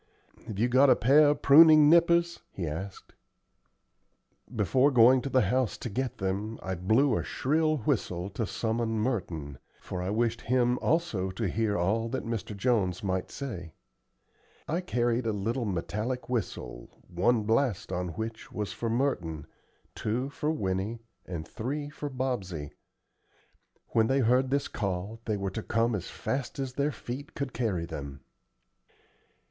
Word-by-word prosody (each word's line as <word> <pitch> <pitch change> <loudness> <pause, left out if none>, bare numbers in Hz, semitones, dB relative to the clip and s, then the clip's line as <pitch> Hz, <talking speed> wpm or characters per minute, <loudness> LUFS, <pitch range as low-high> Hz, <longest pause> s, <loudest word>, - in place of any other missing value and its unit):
"Have 105 - -6
you 115 +4 +2
got 130 +3 +5
a - - +7
pair 145 +5 +5
of 145 - -1
pruning 155 +1 +8
nippers?" 170 +1 +4
he 90 - -4
asked. 85 +6 -6 1.4
Before 130 +6 +3
going 125 0 +6
to 140 - -4
the 130 -1 +3
house 125 +4 0
to 120 - -6
get 130 +3 -2
them, 100 +4 -2
I 95 - -2
blew 110 +9 +2
a - - -1
shrill 155 +3 +1
whistle 100 - -1
to 110 +1 -3
summon 110 +3 -1
Merton, 85 - -3 0.2
for 90 - -5
I 90 - -2
wished 115 +2 0
him 125 0 +1
also 135 - 0
to 100 +3 -2
hear 105 +2 0
all 110 +6 0
that - - -3
Mr. 110 -3 -4
Jones 100 -6 +1
might 95 -1 -1
say. 90 - -7 0.9
I 170 +4 -1
carried 120 -7 0
a - - +2
little 115 +5 -2
metallic 105 +6 -3
whistle 65 - -4 0.2
one 105 +6 +1
blast 115 -1 0
on 90 0 -2
which 110 +3 -6
was 105 -1 -4
for 115 - -3
Merton, 90 - -1 0.5
two 125 +5 -2
for 150 - -2
Winnie, 105 -3 -2 0.2
and 80 -4 -5
three 145 +5 -4
for 150 -1 -5
Bobsey. 105 - -3 1.2
When 110 -1 +3
they 135 +2 +2
heard 125 +2 +3
this 140 +1 0
call 100 +2 -4
they 105 -2 -1
were 100 -1 -3
to 110 - -4
come 115 +2 +1
as 95 -4 -3
fast 135 +1 -4
as 135 -2 -3
their 140 +3 0
feet 130 +1 -7
could 140 -2 -4
carry 100 -9 -1
them. 70 -4 -7
115 Hz, 155 wpm, -29 LUFS, 95-130 Hz, 1.4 s, pruning